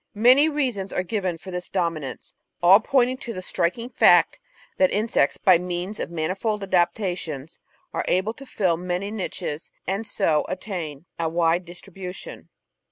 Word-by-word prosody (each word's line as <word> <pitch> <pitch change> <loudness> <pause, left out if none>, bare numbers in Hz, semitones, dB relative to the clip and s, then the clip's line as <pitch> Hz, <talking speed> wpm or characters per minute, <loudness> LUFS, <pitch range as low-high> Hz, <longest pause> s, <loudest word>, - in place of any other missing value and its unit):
Many 255 +7 +6
reasons 250 -10 -1
are 180 - -1
given 185 -3 -2
for 185 +3 -10
this 180 0 -5
dominance, 165 -7 -3 0.3
all 190 +4 +8
pointing 255 +1 +2
to 240 -3 -6
the 185 - -4
striking 185 +7 -1
fact 255 - +4 0.4
that 280 -1 +4
insects, 210 -9 +1
by 185 -3 +5
means 180 +3 -4
of - - -3
manifold 190 +6 -2
adaptations, 175 -5 -1 0.3
are - - -1
able 190 +5 +1
to 275 +4 -12
fill 180 -8 +1
many 180 +3 -3
niches, 180 -6 -4 0.2
and 200 +4 -2
so 160 -9 +2
attain 175 -6 -5
a 165 -1 0
wide 170 +1 +1
distribution. 180 +1 -9
185 Hz, 150 wpm, -24 LUFS, 170-215 Hz, 0.4 s, all